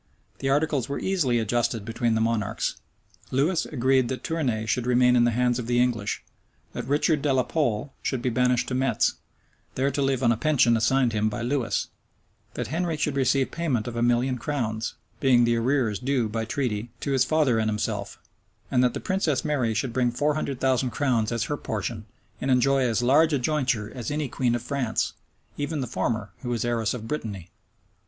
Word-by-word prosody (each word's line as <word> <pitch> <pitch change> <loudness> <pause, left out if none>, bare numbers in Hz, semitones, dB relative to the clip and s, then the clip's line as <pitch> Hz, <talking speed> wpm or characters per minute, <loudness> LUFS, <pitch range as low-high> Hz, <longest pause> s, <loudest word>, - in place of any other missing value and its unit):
The 135 - -1
articles 145 -3 +1
were 140 - -2
easily 160 -11 +1
adjusted 115 -1 0
between 115 0 0
the 110 - +1
monarchs. 110 -1 -1 0.5
Louis 160 +7 +1
agreed 130 -2 +2
that 130 +1 -4
Tournay 130 -10 -1
should 120 +2 -1
remain 125 0 +4
in 120 -1 +5
the - - +4
hands 120 +1 +1
of 115 - -5
the 120 0 +2
English; 115 -5 0 0.5
that 120 0 -5
Richard 145 +2 +2
de 145 - +1
la 130 -1 +3
Pole 135 -3 -1
should 130 - -1
be 125 +1 -1
banished 125 0 +2
to - - -3
Metz, 130 +1 +2 0.6
there 135 +2 +1
to 140 - -1
live 135 -2 +1
on 115 - +5
a 115 - +1
pension 120 -3 +3
assigned 120 +2 +2
him 105 0 +1
by 110 +2 -4
Lewis; 125 -1 -1 0.7
that 120 - -2
Henry 165 +1 -1
should 150 -1 -1
receive 135 0 +2
payment 135 -10 -1
of 120 - -5
a 115 - -1
million 120 +2 +2
of - - -15
crowns, 115 -6 -2 0.2
being 125 -3 +4
the 120 0 +3
arrears 115 -3 +1
due 130 -3 0
by 110 +1 -3
treaty 115 -2 -2
to 140 - -2
his 130 -2 +3
father 135 -5 +2
and 110 0 +1
himself; 105 0 -3 0.5
and 125 -1 +3
that 125 - +2
the - - -2
princess 180 -8 0
Mary 130 -7 0
should 115 +2 -1
bring 125 -1 +2
four 145 +5 0
hundred 140 -3 -3
thousand 130 -1 +1
crowns 120 -3 0
as 115 -2 0
her 145 - -2
portion, 110 -1 -4 0.3
and 135 - -1
enjoy 135 +2 +3
as 120 -2 +1
large 150 +6 +4
a - - +3
jointure 125 -6 0
as 125 -4 -5
any 150 0 -1
queen 125 -1 0
of 120 - -4
France, 125 -3 -1 0.5
even 145 +1 -2
the 130 - -1
former, 110 -3 -2
who 125 - -5
was 120 -1 -1
heiress 115 -1 0
of 110 -2 -7
Brittany. 105 - -5
125 Hz, 200 wpm, -25 LUFS, 115-140 Hz, 0.7 s, in